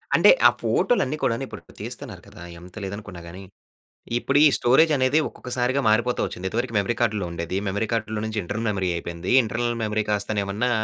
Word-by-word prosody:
అంటే, - - +6 0.2
ఆ - - +8
ఫోటోలన్ని 155 - +1
కూడా‌ను 115 +2 0
ఇప్పుడు - - -10 0.2
తీస్తున్నారు - - -8
కదా! - - -14 0.2
ఎంత 90 +1 -14
లేదు 100 +1 -4
అనుకున్న 105 -4 -9
గాని. 90 +3 -10 0.7
ఇప్పుడు 135 +3 0
ఈ - - +8
స్టోరేజ్ 135 +7 +4
అనేది 130 +4 +3
ఒక్కొక్కసారిగా 125 +2 -2
మారిపోతూ 120 +3 +2
వచ్చింది. 95 +1 -5
ఇంతవరకు 120 +3 -2
మెమరీ 100 +4 -1
కార్డ్‌లో 105 -5 +1
ఉండేది. 85 +2 -3
మెమరీ 100 +3 -1
కార్డ్‌లో 110 -1 -2
నుంచి, 110 -1 -3
ఇంటర్నల్ 110 +6 -3
మెమరీ 95 -3 -1
అయిపోయింది. 85 +1 -5
ఇంటర్నల్ 120 +1 -2
మెమరీ 110 0 0
కాస్తనే 105 0 -1
ఏమన్నా 105 +6 -1
110 Hz, 175 wpm, -24 LUFS, 95-120 Hz, 0.7 s, ఆ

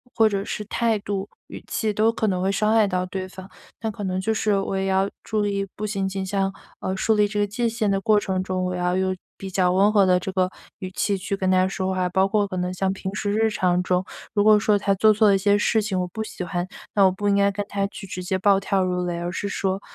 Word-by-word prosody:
或 225 -2 +5
者 200 -2 -1
是 210 - -5
态 225 0 0
度、 200 0 -4 0.2
语 - - -10
气， 215 -2 -1
都 220 +2 +3
可 225 -1 -1
能 185 -3 0
会 190 +1 +1
伤 210 +2 +1
害 220 -2 +5
到 185 -1 -1
对 185 0 -4
方。 190 +1 -11 0.3
那 225 - -2
可 210 -1 -6
能 185 -1 -1
就 220 +4 0
是 210 -2 +1
我 195 - -2
也 190 0 -1
要 190 +1 +1
注 215 -2 -1
意 200 -1 -1
不 215 +1 -3
仅 195 -2 -1
仅 190 0 -3
像 195 0 -1 0.3
呃 190 - -2
树 220 - +2
立 210 0 +4
这 205 0 -2
个 205 - +2
界 230 +3 -1
限 225 -2 -1
的 195 0 +1
过 215 0 +4
程 185 -2 -2
中， 185 -1 -2
我 180 0 -2
要 180 +1 0
用 190 0 0 0.2
比 195 - -7
较 180 -1 +2
温 195 +3 +4
和 200 -2 +5
的 180 -1 +4
这 185 - -5
个 185 -1 +1 0.3
语 185 -1 -6
气 200 0 0
去 195 +1 -3
跟 190 -1 0
他 185 0 +4
说 190 0 -2
话， 180 -1 0
包 190 +2 +2
括 205 0 +1
可 185 -2 -5
能 180 0 -2
像 190 +1 0
平 190 0 -5
时 205 -1 -1
日 220 +1 +2
常 180 -3 +1
中， 180 0 0 0.3
如 205 -1 +2
果 215 -1 +6
说 210 -1 +3
他 200 0 +1
做 215 +2 +5
错 215 0 +4
了 195 - +5
一 - - +3
些 205 +1 +3
事 220 +1 +2
情， 200 -3 -2
我 180 - 0
不 220 +4 -5
喜 185 - -6
欢， 175 +1 -3 0.3
那 200 -2 +5
我 185 - +5
不 205 +2 -1
应 200 - +3
该 200 0 +4
跟 200 +1 -3
他 200 0 -1
去 200 - -9
直 185 -1 -6
接 185 +1 -1
暴 195 0 +4
跳 195 -1 0
如 180 -1 -1
雷 175 -1 -2
而 175 +1 -3
是 200 - -3
说， 195 0 -2
195 Hz, 300 characters per minute, -23 LUFS, 185-210 Hz, 0.3 s, 果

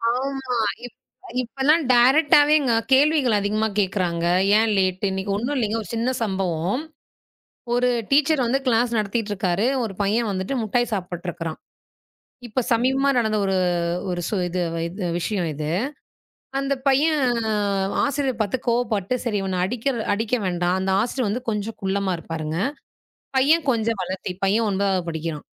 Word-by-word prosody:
ஆமா. 265 -1 -2 0.3
இப்ப 245 - -12 0.4
இப்பலாம் 275 +6 +2
டேரைக்ட்டாவேங்க 290 +2 +5 0.2
கேள்விகள் 275 -5 +4
அதிகமா 210 +2 0
கேக்குறாங்க. 180 -4 0 0.3
ஏன் 225 -1 +2
லேட்டு? 190 +1 +1
இன்னைக்கு 190 +1 -3
ஒண்ணும் 250 +7 -2
இல்லைங்க. 225 -2 0
ஒரு 195 - -12
சின்ன 235 +3 0
சம்பவம். 190 - -1 0.9
ஒரு 250 +1 +2 0.2
டீச்சர் 280 -1 +3
வந்து 265 +4 +1
கிளாஸ் 235 0 +2
நடத்திட்டு 210 0 -1
இருக்காரு. 190 +2 0 0.2
ஒரு 215 -4 -4
பையன் 215 +3 +1
வந்துட்டு 190 +7 -3
முட்டாய் 240 +2 0
சாப்பிட்டு 180 -2 -4
இருக்கிறான். 165 -1 -5 0.9
இப்ப 245 +3 -1
சமீபமா 265 +4 +2
நடந்த 220 -3 +1
ஒரு 195 -1 0 0.7
ஸ் - - -5
ஒரு 185 -2 0
இது 180 +1 -2 0.3
இது 185 +2 -5
விஷயம் 185 -1 -1
இது. 150 +1 -4 0.9
அந்தப் 275 -1 -2
பையன் 295 +3 +3 0.9
ஆசிரியர் 275 -4 -1
பாத்து 215 +4 0
கோப்பட்டு, 230 -3 0
சரி 220 -4 0
இவனை 190 -1 -2
அடிக்க 230 +6 -5 0.3
அடிக்க 225 +4 -1
வேண்டாம். 175 0 0
அந்த 190 0 -1
ஆசிரியர் 245 0 -2
கொஞ்சம் 215 +1 -4
குள்ளமா 195 -1 0
இருப்பாருங்க. 160 -1 -5 0.8
பையன் 300 +4 +3
கொஞ்சம் 230 -2 0
வளத்தி. 185 0 -4
பையன் 215 +4 +2
9வது 190 -2 0
படிக்கிறான். 160 -2 -4
220 Hz, 135 wpm, -23 LUFS, 190-255 Hz, 0.9 s, டேரைக்ட்டாவேங்க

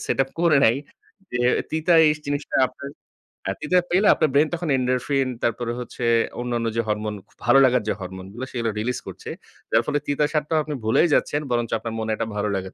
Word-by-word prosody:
Setup 135 0 0
করে 170 -4 +4
নেয় 120 +4 +4 0.5
যে 125 - -1 0.3
তিতা 160 +2 +1
এই - - +5
স - - -15
জিনিসটা 145 +1 -2
আপনার 140 +2 -9 0.5
হ্যাঁ - - -2
তিতা 180 +4 +3
পেলে 190 +4 +3
আপনার 155 - +1
ব্রেইন 150 +2 +4
তখন 175 -1 -3
endorphin 130 +1 0
তারপরে 120 0 -1
হচ্ছে 125 0 -6 0.4
অন্যান্য 120 -1 -2
যে - - +3
হরমোন 105 0 -2
খু - - -29
ভালো 130 +3 +6
লাগার 125 -2 +3
যে - - +2
হরমোন 95 0 -7
গুলা, 125 +4 -6
সেগুলো 115 -3 -1
রিলিজ 125 +3 -2
করছে। - - -8 0.4
যার 115 - +4
ফলে 145 - +1
তিতাসাদটাও 150 +2 0
আপনি 150 -1 -4
ভুলেই 115 +10 +3
যাচ্ছেন 145 - +1
বরঞ্চ 120 -1 0
আপনার 115 0 -6
মনে 110 0 -2
একটা 115 +1 -2
ভালো 105 0 0
লাগা 95 0 -4
125 Hz, 200 wpm, -23 LUFS, 115-145 Hz, 0.5 s, ভালো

